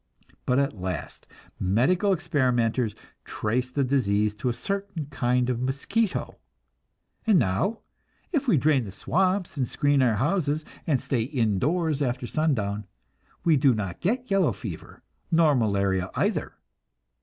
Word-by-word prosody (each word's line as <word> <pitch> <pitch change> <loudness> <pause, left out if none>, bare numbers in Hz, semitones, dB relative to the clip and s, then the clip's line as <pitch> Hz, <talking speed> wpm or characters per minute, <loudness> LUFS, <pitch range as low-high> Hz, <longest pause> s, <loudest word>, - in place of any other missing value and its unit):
But 125 - +3
at 135 -9 0
last 90 -2 -5 0.3
medical 130 - +2
experimenters 125 - +1 0.3
traced 125 +4 -2
the 140 - +2
disease 105 -6 +1
to 125 +4 -1
a - - +2
certain 195 +5 -4
kind 125 -2 +1
of 125 -1 -1
mosquito, 140 - -1 0.9
and 215 -4 +6
now, 160 - 0 0.5
if 285 -6 0
we 190 - +4
drain 140 -3 +2
the 100 - -7
swamps 185 - 0
and 130 -3 0
screen 145 +1 +2
our 120 -4 +3
houses 150 - 0 0.2
and 140 -5 +2
stay 125 -1 -1
in 115 -5 0
doors 160 - 0
after 125 -2 -1
sundown, 105 -9 -1 0.6
we 165 -2 +4
do 130 -2 +4
not 95 -5 -4
get 245 +5 -1
yellow 195 -5 +3
fever, 95 -9 -8 0.3
nor 165 -2 +4
malaria 100 -6 +1
either. - - 0
130 Hz, 140 wpm, -26 LUFS, 110-165 Hz, 0.9 s, and